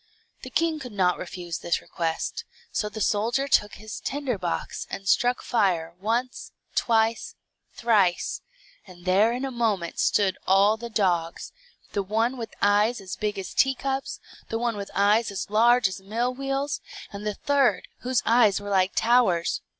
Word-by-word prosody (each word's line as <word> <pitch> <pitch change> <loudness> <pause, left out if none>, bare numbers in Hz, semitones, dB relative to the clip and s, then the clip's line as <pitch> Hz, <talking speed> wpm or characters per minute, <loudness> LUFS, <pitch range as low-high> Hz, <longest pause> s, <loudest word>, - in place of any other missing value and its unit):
The 255 - -8
king 320 +3 0
could 250 -5 -8
not 185 -3 +1
refuse 175 -1 -6
this 170 - 0
request, 170 - -3 0.3
so 210 - -1
the 215 +1 -7
soldier 230 +7 +1
took 210 -6 +2
his 215 0 -8
tinder 270 -6 -3
box, 175 -2 -3
and 195 - -6
struck 245 +5 +2
fire, 175 -8 +1
once, 235 +5 -2 0.2
twice, 225 -1 +1 0.4
thrice, 205 -7 +1 0.5
and 175 -1 -14
there 200 +5 +4
in 250 +3 -2
a 270 - -4
moment 215 -8 -1
stood 195 -3 +2
all 195 +3 +5
the 235 +1 -7
dogs; 175 -6 -1 0.4
the 200 - 0
one 225 +6 0
with 230 -3 -7
eyes 210 +4 +3
as 190 -2 -6
big 210 -1 -2
as 190 -2 -6
teacups, 270 0 0 0.3
the 225 - -1
one 235 -1 -1
with 200 -1 -6
eyes 205 +3 +3
as 200 0 -5
large 235 +1 +5
as 190 0 -7
mill 230 +6 -1
wheels, 275 +2 -2 0.3
and 200 +1 -7
the 210 - -2
third, 270 -9 +1
whose 250 -1 0
eyes 225 -4 +4
were 205 0 -7
like 190 0 +2
towers. 225 -8 +2
215 Hz, 165 wpm, -25 LUFS, 195-245 Hz, 0.5 s, all